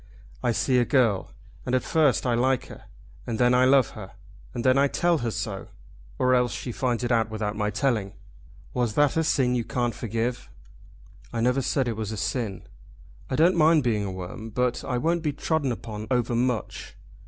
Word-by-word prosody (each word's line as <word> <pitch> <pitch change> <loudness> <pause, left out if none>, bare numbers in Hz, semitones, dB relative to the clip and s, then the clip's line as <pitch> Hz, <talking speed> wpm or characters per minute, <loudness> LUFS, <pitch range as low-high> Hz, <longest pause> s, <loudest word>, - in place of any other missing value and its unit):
I - - +1
see 125 +2 +2
a - - +4
girl, 120 -7 +1 0.3
and 130 0 0
first 155 -6 +2
I 125 - +2
like 130 +2 +1
her, - - -12 0.4
and 115 -2 -2
then 125 +1 +4
I 125 +1 +5
love 130 -2 +4
her, 95 -3 -10 0.4
and 120 - -4
then 130 0 +4
I 140 +1 +4
tell 170 +3 +1
her 120 - -1
so; 105 -3 -4 0.5
or 130 0 +3
else 125 -1 +2
she 125 - -5
finds 125 0 -1
it 120 - -1
out 115 -2 +2
without 105 -1 -3
my 105 -1 -1
telling. 105 -3 -1 0.6
Was 120 -4 -1
that 145 -1 +3
a 160 - +2
sin 130 -5 +2
you 120 -1 0
can't 120 0 -1
forgive?" 115 +3 -3 0.8
"I 115 - -3
never 125 +3 +2
said 130 0 0
it 115 -2 -2
was 110 -1 -3
a 110 - -5
sin." 105 -1 -3 0.7
"I - - -1
don't 170 +5 +4
mind 160 -2 +4
being 110 -4 +1
a 100 - -3
worm, 95 +4 -7
but 125 +2 -1
I 125 - -2
won't 165 +6 0
be 150 -2 -1
trodden 145 -1 -1
upon 110 -2 -6
overmuch. 120 -2 -1
125 Hz, 195 wpm, -25 LUFS, 110-130 Hz, 0.8 s, I